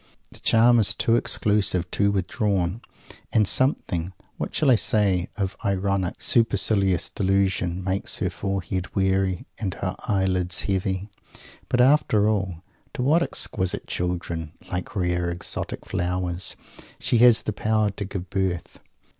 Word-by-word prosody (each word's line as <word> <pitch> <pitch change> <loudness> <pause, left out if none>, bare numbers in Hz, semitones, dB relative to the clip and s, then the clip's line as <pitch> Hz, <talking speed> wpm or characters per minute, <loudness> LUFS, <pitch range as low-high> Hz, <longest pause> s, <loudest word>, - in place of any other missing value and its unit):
The - - -12
charm 120 +1 +4
is 105 - +3
too 115 - +2
exclusive, 100 -6 +1
too 100 0 +2
withdrawn. 100 0 -1 0.5
And 105 -3 +3
something 95 - +3 0.2
what - - -5
shall 145 -4 +4
I - - +7
say? 100 -5 +1
of 100 -2 -2
ironic, 95 -1 -1
supercilious 100 - +2
disillusion 95 -2 0
makes 95 +1 -2
her - - -1
forehead 95 -2 -4
weary, 95 -1 +1
and 95 -5 -3
her 95 -1 -3
eyelids 95 -3 +1
heavy. 95 0 -2 0.6
But 125 - +3
after 125 -6 +4
all, 95 -5 -1 0.3
to 125 - -2
what 155 +6 +3
exquisite 95 - -1
children, 85 -3 -3 0.2
like 90 +2 -4
rare, 90 -2 0
exotic 85 0 -3
flowers, 90 0 -2 0.4
she 120 - +1
has 120 -1 +6
the 110 - -2
power 110 0 +1
to 100 +1 -6
give 95 -2 -6
birth! 95 -3 -2
95 Hz, 135 wpm, -24 LUFS, 90-105 Hz, 0.6 s, I